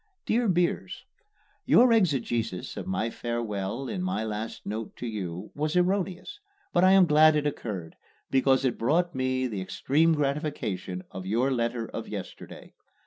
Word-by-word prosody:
DEAR 235 +1 +1
BEERS: 175 -1 0 0.6
Your 245 -1 +6
exegesis 130 - 0
of - - -6
my 110 +5 -1
farewell 115 0 -3
in 190 - -3
my 185 -9 -1
last 110 +1 -5
note 110 +1 -5
to - - -7
you 95 -6 -5
was 150 +2 -2
erroneous, 190 - 0 0.3
but 175 - +4
I 185 +1 +7
am 195 -1 +7
glad 155 0 +6
it 150 -1 0
occurred, 100 - -4 0.4
because 135 0 +3
it 125 - 0
brought 165 +9 +1
me 130 -1 0
the 105 -6 -3
extreme 155 - +2
gratification 140 - -2
of 95 0 -7
your 120 +7 +1
letter 120 -2 -1
of - - -6
yesterday. - - -8
130 Hz, 150 wpm, -27 LUFS, 110-165 Hz, 0.6 s, I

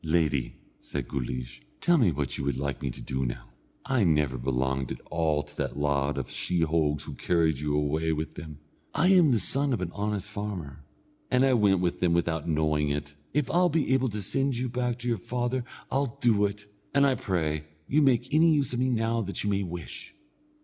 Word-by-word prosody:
"Lady," 80 -5 +1 0.2
said - - -5
Guleesh, 60 -2 -4 0.2
"tell 175 -2 +4
me 110 -9 +4
what 70 -3 -2
you - - -4
would 70 -1 -1
like 70 -1 -3
me 70 - -2
to - - -8
do 65 0 -2
now. - - -5 0.4
I 130 -5 +2
never 75 -7 +2
belonged 65 +1 -1
at - - -5
all 75 -2 +1
to 75 +1 -17
that - - -2
lot 70 -1 0
of - - -4
sheehogues 80 -4 0
who - - -7
carried 80 -5 +1
you 75 0 -1
away 75 +2 +1
with 80 0 -3
them. 75 -2 -9 0.4
I 180 - +4
am 180 -5 +6
the 120 - +4
son 135 +5 +2
of 120 - 0
an 90 -2 -3
honest 105 -1 -2
farmer, 90 -10 -5 0.5
and 125 +1 +4
I 135 - +4
went 100 -6 +4
with 90 -1 0
them 90 -2 +2
without 85 -2 0
knowing 75 -1 +1
it. 70 0 -3 0.2
If 145 -1 0
I'll 180 +1 +4
be 150 -4 +1
able 130 -1 +2
to 105 -1 -4
send 135 +6 0
you 125 +1 -1
back 125 0 -1
to 120 0 -6
your 115 -4 0
father 120 +5 -2 0.3
I'll 135 -3 -1
do 105 -4 +3
it, 100 +1 -9 0.3
and 140 0 +6
I 135 - +4
pray 80 -9 -1 0.2
you 150 +3 +3
make 130 -2 +2
any 160 +1 +5
use 140 -4 +1
of 120 - -1
me 130 +1 +2
now 115 -1 +1
that 100 -2 -3
you 105 - 0
may 100 0 +1
wish." 90 - -7
90 Hz, 210 wpm, -28 LUFS, 75-125 Hz, 0.5 s, am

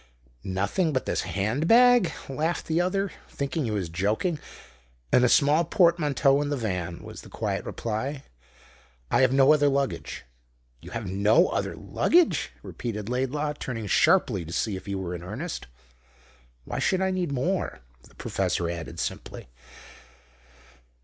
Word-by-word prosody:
"Nothing 100 - 0
but 130 - -1
this - - 0
hand 105 - -1
bag?" 245 -5 +6 0.2
laughed 155 +6 -2
the 165 +2 +1
other, 195 +2 0 0.2
thinking 140 +1 -2
he - - -2
was 100 -5 -2
joking. 105 - -1 0.7
"And 125 - +6
a 125 - +5
small 150 +5 +4
portmanteau 150 -5 +3
in 145 - -2
the 145 - -1
van," 90 -7 -3
was - - -9
the - - -14
quiet - - -3
reply. 130 +6 -3 0.9
"I - - +4
have 130 -1 +4
no 135 +2 +6
other 145 -1 +3
luggage." 140 -1 -2 0.6
"You - - -10
have 115 -2 -5
no 105 - +3
other - - -2
luggage?" 350 -1 +2
repeated 105 -3 -5
Laidlaw, 135 +4 -1
turning 115 -4 -4
sharply 90 - +3
to 80 - -9
see 100 +4 -1
if 95 - -9
he 100 - -2
were 95 -2 -4
in 90 - -6
earnest. 110 - -6 1.0
"Why - - -4
should 190 0 +1
I 190 - +1
need 180 -5 -1
more?" 140 - -1 0.2
the - - -20
professor 85 -1 -1
added 85 -1 -6
simply. - - -5
135 Hz, 150 wpm, -26 LUFS, 100-160 Hz, 1.0 s, bag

